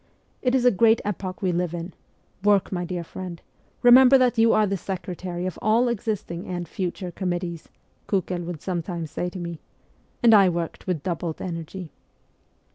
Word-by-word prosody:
'It 250 0 +2
is 250 -1 +2
a 245 - +7
great 225 +3 +4
epoch 195 -2 -4
we 185 - +2
live 175 -1 -1
in; 170 +1 -6 0.5
work, 205 -2 +3
my 180 -2 -2
dear 175 0 -4
friend; 175 0 -7 0.4
remember 255 +2 +8
that 250 -1 +3
you 225 0 +5
are 215 - +4
the 195 -1 -1
secretary 180 -1 -5
of 185 - -4
all 225 +4 +3
existing 210 -6 -3
and 175 -1 -4
future 180 0 -4
committees,' 175 -3 -4 0.4
Kukel 185 -3 -1
would 170 -4 -6
sometimes 170 -3 -3
say 180 - -2
to 185 - -9
me, 170 -2 -5 0.6
and 230 -1 +7
I 200 -3 +7
worked 170 +1 -4
with 175 -6 -1
doubled 170 -3 -3
energy. 170 0 -6
185 Hz, 170 wpm, -24 LUFS, 175-210 Hz, 0.6 s, remember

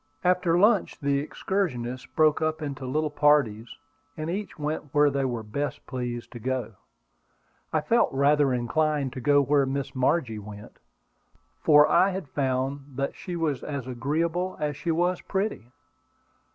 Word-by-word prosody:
After 180 -1 +2
the - - +4
lunch 210 +1 +3
the 140 -1 +1
excursionists 130 -7 -3
broke 155 -1 +2
up 155 0 0
into 140 -2 -5
little 150 +3 -1
parties, 140 -8 +2 0.4
and 155 +1 -3
each 205 +3 -5
went 150 -1 -4
where 145 -1 +5
they 135 -1 0
were 120 -3 -3
best 140 +7 -4
pleased 120 -2 -5
to 120 - -8
go. 125 -2 -3 1.0
I 155 - +1
felt 230 +10 +2
rather 140 +1 +3
inclined 140 +2 0
to 130 - -6
go 145 +2 +4
where 140 0 +2
Miss 135 0 -3
Margie 130 -4 0
went, 105 0 -11 0.8
for 150 -1 +6
I 190 - +4
had 190 -4 -5
found 135 0 -1 0.3
she 180 - -7
was 155 -6 -1
as 140 -4 -5
agreeable 160 +9 -1
as 150 -1 -1
she 170 - -5
was 175 +2 +1
pretty. 195 - -2
145 Hz, 150 wpm, -26 LUFS, 130-160 Hz, 1.0 s, for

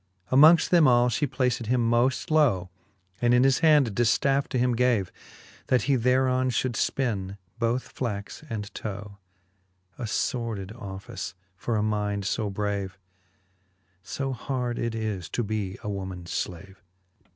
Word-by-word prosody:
XXIII. 130 - +4
Amongft 160 +3 +7
them 170 -5 +5
all 120 -1 +4
fhe 140 +4 0
placed 125 -3 0
him 120 -1 +2
moft 120 +5 +1
low, 120 - +2 0.5
And 120 0 +4
in 125 - +5
his 135 -1 +4
hand 150 -5 +5
a - - -4
diftafFe 125 +5 +2
to - - -2
him 125 0 +2
gave, 115 -6 +1 0.6
That 125 -4 +2
he 140 - +2
thereon 130 +1 +2
fhould 125 +1 0
fpin 105 -6 -1 0.2
both 120 +2 0
flax 105 +2 -5
and 105 -3 -5
tow; 100 -1 -7 0.8
A 120 - -3
fordid 110 -4 -2
office 95 -5 -7 0.2
for 115 +4 -2
a 105 - +1
mind 105 -2 -1
fo 105 +1 -1
brave, 100 -1 -3 1.0
So 135 +8 -4
hard 125 -1 -3
it 115 -1 -2
is 105 -6 -3
to 120 - -1
be 105 -3 -3
a - - -5
womans 95 -3 -5
flave. 95 +2 -5
115 Hz, 150 wpm, -26 LUFS, 100-130 Hz, 1.0 s, Amongft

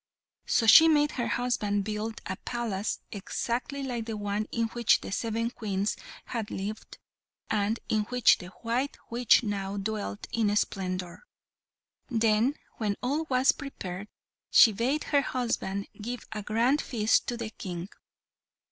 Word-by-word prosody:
So 230 - +3
she 320 +9 +9
made 295 -2 +4
her 240 - -2
husband 210 -5 0
build 215 +2 -4
a 190 - -3
palace 225 -4 -3
exactly 240 +7 -3
like 240 -4 -3
the 220 -2 -3
one 205 +1 -2
in 230 -1 0
which 235 -1 +3
the - - -7
seven 230 +2 -1
Queens 205 -4 -2 0.3
had 225 -4 -4
lived, 210 +3 -5 0.5
and 215 +1 +1
in 215 -1 +1
which 250 +1 +4
the 180 - -8 0.2
white 245 +5 -1
witch 240 +1 +4
now 200 -2 -3
dwelt 205 0 -3
in 210 -3 +1
splendour. 185 -3 -2 0.9
Then, 225 +2 +2 0.2
when 210 -3 -1
all 290 +6 0
was 255 0 +4
prepared, 200 -9 -7 0.4
she 225 - +8
bade 255 +8 0
her 285 -2 +2
husband 230 -7 -2
give 240 +3 -5
a 215 -1 -4
grand 235 +8 +2
feast 225 -3 +1
to 240 - -2
the 230 -2 -5
King. 180 -4 -6
225 Hz, 145 wpm, -28 LUFS, 205-245 Hz, 0.9 s, she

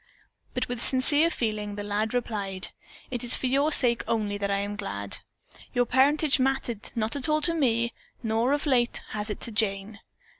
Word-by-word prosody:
But 250 - -1
with 245 -1 -4
sincere 290 +6 +3
feeling 215 -7 -3
the 205 - -5
lad 210 +3 -2
replied: 200 -6 -3 0.4
"It 245 -2 -3
is 245 - +9
for - - -3
your 280 +4 +2
sake 240 -5 +4
only 210 -3 -1
that 200 0 -2
I 200 - +1
am 205 +1 -3
glad. 100 - -3 0.6
Your 245 0 +3
parentage 280 +3 +3
mattered 260 -4 -1
not 225 +2 -1
at 280 0 +2
all 305 0 +2
to 335 +2 +4
me, 235 -6 0 0.3
nor, 225 +3 0
of 290 - -1
late, 245 -4 +1
has 210 +1 -4
it 210 - -5
to 235 - -2
Jane." 205 -1 -2
235 Hz, 185 wpm, -26 LUFS, 210-260 Hz, 0.6 s, is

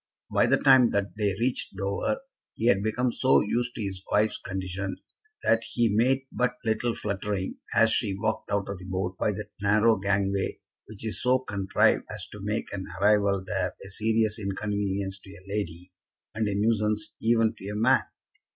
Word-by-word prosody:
By - - +4
the - - +4
time 130 -3 +6
that 100 0 -1
they 105 -3 0
reached 125 +2 -1
Dover 100 - -1 0.3
he 110 - -3
had 110 -5 +4
become 120 +4 0
so 130 +2 +4
used 120 +3 -1
to 110 - -3
his 95 -2 -4
wife's 105 +1 +2
condition 95 0 -4 0.5
that 115 0 +3
he 115 -4 +2
made 130 +4 +3
but 125 0 0
little 115 +1 0
fluttering 100 -2 -3 0.2
as 115 0 +5
she 100 -5 +1
walked 110 +2 -2
out 100 -1 0
of 100 -2 -5
the 95 - -10
boat 95 0 -2
by - - +2
that - - -7
narrow 105 +2 +4
gangway 100 0 0 0.3
which 110 0 -10
is 110 0 -3
so 125 +2 +4
contrived 100 -7 +1
as - - -4
to - - -9
make - - -3
an 95 -2 -4
arrival 100 -1 +3
there 95 -3 -2
a - - -9
serious 110 +1 +1
inconvenience 100 -1 -2
to 95 - -14
a 95 -1 -12
lady, 95 -3 -4 0.4
and 110 -1 -1
a 100 - -1
nuisance 105 0 0
even 115 -1 +3
to 95 - -8
a 105 - -4
man. 115 +5 +4
105 Hz, 180 wpm, -27 LUFS, 100-115 Hz, 0.5 s, time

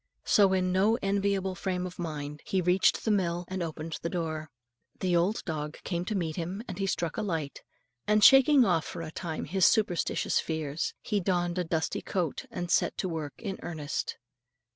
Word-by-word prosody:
So, 200 -2 +5
in 185 -1 +1
no 200 +5 +3
enviable 195 -1 +1
frame 180 0 -2
of 180 0 -8
mind, 150 -3 -5
he 190 - 0
reached 180 +1 +3
the 220 - +3
mill 175 -3 0
and 185 0 -4
opened 160 -1 -4
the 170 - -2
door. 160 -3 -3 0.5
The 180 -2 +1
old 180 +6 +1
dog 150 -2 -4
came 175 -1 -2
to 215 - -2
meet 165 -5 -2
him, 180 +5 -4
and 185 +1 -6
he 195 - 0
struck 170 -3 -2
a - - 0
light, 165 -8 -3 0.5
and 210 0 +4
shaking 270 -1 +8
off 170 -5 +2
for 165 - -6
a 155 - -6
time 160 -2 -4
his 190 -1 +4
superstitious 205 -6 +1
fears, 160 -1 -3
he 210 - 0
donned 175 -1 0
a - - +1
dusty 160 -1 -1
coat, 175 -7 -2
and 175 -1 -4
set - - +2
to 190 - -1
work 160 -4 -4
in 200 -4 -5
earnest. 155 -3 -4
180 Hz, 190 wpm, -29 LUFS, 160-195 Hz, 0.5 s, shaking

